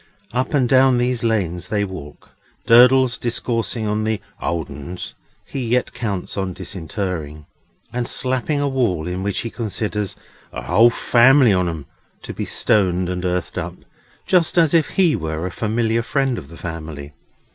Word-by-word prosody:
Up 130 +4 -1
and 130 -4 +3
down 130 0 +5
these 120 -1 0
lanes 90 -6 0
they 105 0 0
walk, 90 -7 -10 0.3
Durdles 125 0 +6
discoursing 115 -1 -1
of 105 +1 0
the 110 -1 -1 0.2
"old 85 -1 -2
uns" 75 +5 -7 0.3
he 140 - -6
yet 120 +2 0
counts 105 -7 -4
on 95 -2 -2
disinterring, 80 -5 -5 0.5
and 120 -1 -2
slapping 130 +3 0
a 145 - +1
wall, 115 - 0
in 90 +1 -3
which 100 0 -1
he 115 - -5
considers 105 -3 -3 0.4
"a - - -6
whole 115 +7 +5
family 120 +1 +5
on 90 -2 +1
'em" 80 -4 -6 0.4
to - - -6
be - - -4
stoned 90 -3 +1
and 90 0 -3
earthed 90 -1 -2
up, - - -5 0.5
just 180 -2 +2
as 165 -2 +4
if 165 -3 +3
he 180 -6 +3
were 80 +1 -3
a 90 - -3
familiar 115 +3 0
friend 135 +1 0
of 70 - -12
the 85 +2 -13
family. 80 -3 -7
110 Hz, 165 wpm, -20 LUFS, 90-125 Hz, 0.5 s, Durdles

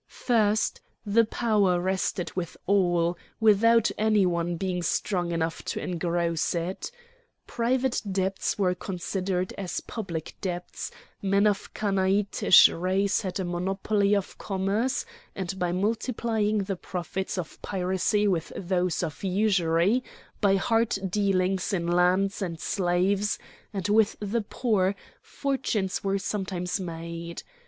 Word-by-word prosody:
First, 215 -3 +1 0.2
the 220 +3 +4
power 210 -6 +2
rested 185 0 -1
with 180 -2 -4
all, 175 -3 +2 0.2
without 225 +1 +5
any 215 -2 +4
one 170 -1 0
being 180 0 -2
strong 175 +1 0
enough 165 -1 -1
to - - -2
engross 170 -1 -1
it. 175 - -3 0.6
Private 250 +2 0
debts 190 0 -1
were 185 -3 +2
considered 185 0 -3
as 185 -3 -3
public 175 -8 -5
debts, 180 -2 -4 0.3
men 200 +1 +3
of 205 -2 0
Chanaanitish 195 -1 +5
race 190 +3 0
had 190 -2 -3
a 190 - -1
monopoly 195 +3 +1
of 200 -2 -3
commerce, 205 +7 -1 0.3
and 190 0 -4
by 175 -1 0
multiplying 215 +1 0
the 195 -1 -3
profits 185 +2 -4
of 175 -3 -6
piracy 190 +2 0
with 175 -5 0
those 180 -1 0
of 160 +1 -5
usury, 190 +2 +2 0.4
by 200 -2 +4
hard 225 +2 +2
dealings 190 -1 +1
in 175 -3 0
lands 180 +3 +2
and 170 -4 -3
slaves 190 +4 +1 0.3
and 195 -4 -3
with 215 +1 +3
the 210 +3 -1
poor, 205 -3 0 0.3
fortunes 260 -9 -2
were 195 0 +1
sometimes 190 -2 -2
made. 170 -1 -6
190 Hz, 125 wpm, -27 LUFS, 180-205 Hz, 0.6 s, without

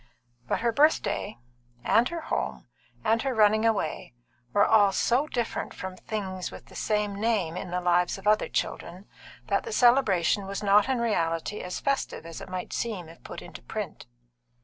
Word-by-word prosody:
But - - 0
her 235 0 +2
birthday, 285 -5 +2 0.5
and 235 +2 +3
her 340 -1 -4
home, - - -3 0.4
and 225 +1 +2
her 265 -2 -1
running 215 +1 +4
away, 180 - -2 0.4
were 205 - +4
all 205 -3 +5
so 250 +8 +2
different 240 -6 -3
from 185 0 -6
things 190 -2 -4
with - - -11
the - - -16
same 210 -2 -1
name 205 -8 +1
in 180 - -5
the 180 +1 -1
lives 175 +1 +2
of 195 - -12
other 210 +1 +3
children, 180 +4 -3 0.4
that - - 0
the 460 - -6
celebration 215 - +3
was 200 +1 -4
not 205 +4 +4
in 260 -2 +1
reality 170 -4 0
as 180 - -5
festive 275 - -2
as 165 -1 -8
it - - -9
might 185 0 -5
seem 200 -8 -3
if 165 - -15
put - - -8
into - - -10
print. 210 - -6
205 Hz, 175 wpm, -27 LUFS, 180-230 Hz, 0.5 s, all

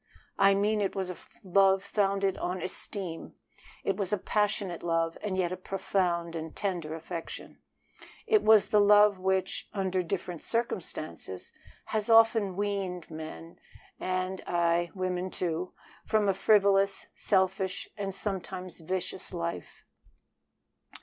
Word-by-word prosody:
I 195 0 +6
mean 210 +2 +2
it 195 0 -1
was 190 -2 -2
a 180 - -9 0.3
love 195 0 +4
founded 195 -1 +1
on 180 +1 -2
esteem; 185 -2 -5 0.5
it 195 - 0
was 195 -3 -2
a 210 - +2
passionate 200 -3 -1
love, 165 -1 0
and 195 -3 -2
yet 180 -2 +1
a - - -1
profound 180 -2 -1
and 160 -1 -6
tender 175 -6 -2
affection. 165 +1 -7 0.7
It 430 -2 +4
was 215 -2 +6
the 210 - +5
love 205 -1 +6
which, 190 0 -1
under 190 -2 0
different 180 -1 -4
circumstances, 160 - -4 0.3
has 215 0 -1
often 225 -4 +5
weaned 195 -3 -2
men, 160 +1 -8 0.4
ay, 185 0 -2
and 170 0 +1
women, 185 0 -2
too, 175 0 -3 0.3
from 215 -2 +2
a 195 - +4
frivolous, 195 0 +3
selfish, 190 -1 0
and 200 -2 -3
sometimes 190 -2 -5
from 165 - -15
a - - -19
vicious 185 0 -3
life. 170 - -5
190 Hz, 135 wpm, -29 LUFS, 175-200 Hz, 0.7 s, I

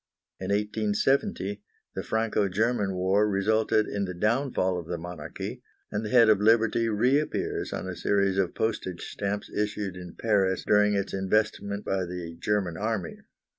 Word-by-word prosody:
In 95 - -5
1870 105 - 0 0.3
the - - -3
Franco 110 -3 0
German 105 0 0
War 95 +3 +2
resulted 110 +2 +2
in 100 -1 -2
the 90 -1 -5
downfall 105 -3 +1
of 85 - -9
the 85 - -3
monarchy, 85 -2 -7 0.3
and 105 +1 -2
the 105 - -4
head 120 -1 +6
of 105 -2 +4
Liberty 115 +1 +3
reappears 125 +8 0
on - - -4
a 95 - -4
series 100 +2 +1
of 95 -3 0
postage 95 -5 -2
stamps 100 0 -3
issued 105 -2 -2
in 90 -1 -9
Paris 100 -4 +1
during 105 0 +4
its 100 -1 -2
investment 100 +1 0
by 95 -1 0
the 85 -2 -6
German 100 -6 0
army. 105 -4 -3
105 Hz, 155 wpm, -27 LUFS, 95-110 Hz, 0.3 s, head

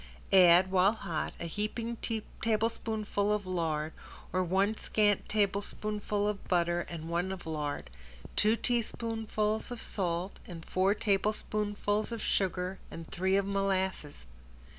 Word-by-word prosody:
Add, 185 0 +7
while 190 +2 +5
hot, 165 -8 -3
a - - -4
heaping 220 +6 -3 0.4
tablespoonful 215 -2 0
of 210 -1 0
lard 160 -4 -1 0.4
or 185 0 +2
one 195 +4 +2
scant 210 -2 +1
tablespoonful 205 0 0
of 210 -1 -3
butter 175 -1 +2
and 165 -2 -6
one 175 +3 0
of 190 -2 -6
lard, 150 - -3 0.4
two 215 +2 +4
teaspoonfuls 225 -2 -1
of 245 -1 -5
salt 180 -2 -2
and 165 -2 -8
four 190 +2 +2
tablespoonfuls 210 +1 0
of 230 - -3
sugar 185 -2 0
and 165 0 -9
three 190 +2 +1
of 200 0 +2
molasses. 190 - -1
195 Hz, 125 wpm, -31 LUFS, 180-215 Hz, 0.4 s, Add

